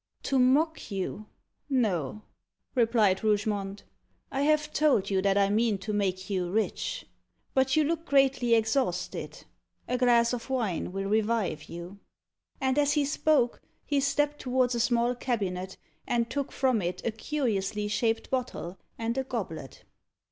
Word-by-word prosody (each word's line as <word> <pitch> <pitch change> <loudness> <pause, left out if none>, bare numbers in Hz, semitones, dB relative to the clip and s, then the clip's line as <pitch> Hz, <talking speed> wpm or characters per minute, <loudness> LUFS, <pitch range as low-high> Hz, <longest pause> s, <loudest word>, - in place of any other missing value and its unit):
"To 270 - +1
mock 290 +5 +2
you 200 +1 -4 0.4
no," 215 - 0 0.5
replied 225 -6 +3
Rougemont. 205 -2 0 0.5
"I 270 - -1
have 300 +1 +2
told 260 -11 +2
you 190 -1 +2
that 195 0 +2
I 200 0 +3
mean 220 -1 +2
to 210 +3 -5
make 190 -2 -1
you 185 -3 -1
rich. 220 - -2 0.5
But 265 0 +3
you 310 - +4
look 330 +2 -2
greatly 270 -4 +4
exhausted. 220 -5 -1 0.4
A 250 - -1
glass 240 -1 +4
of 240 +1 -5
wine 220 -10 -1
will 195 +1 -3
revive 215 -7 0
you." 175 +4 -9 0.6
And 265 +1 +1
as 290 0 +3
he 295 -1 +2
spoke, 285 -3 +2 0.2
he 285 -1 +1
stepped 290 +2 +1
towards 255 -1 +1
a 235 - -1
small 240 +1 +2
cabinet, 190 -7 -3 0.3
and 235 -1 0
took 280 -2 -2
from 255 -5 +1
it 175 0 -4
a 230 - +1
curiously 215 -5 -1
shaped 225 +2 0
bottle 240 -8 -3 0.2
and 230 +3 -1
a - - 0
goblet. 185 - -6
230 Hz, 150 wpm, -28 LUFS, 200-265 Hz, 0.6 s, you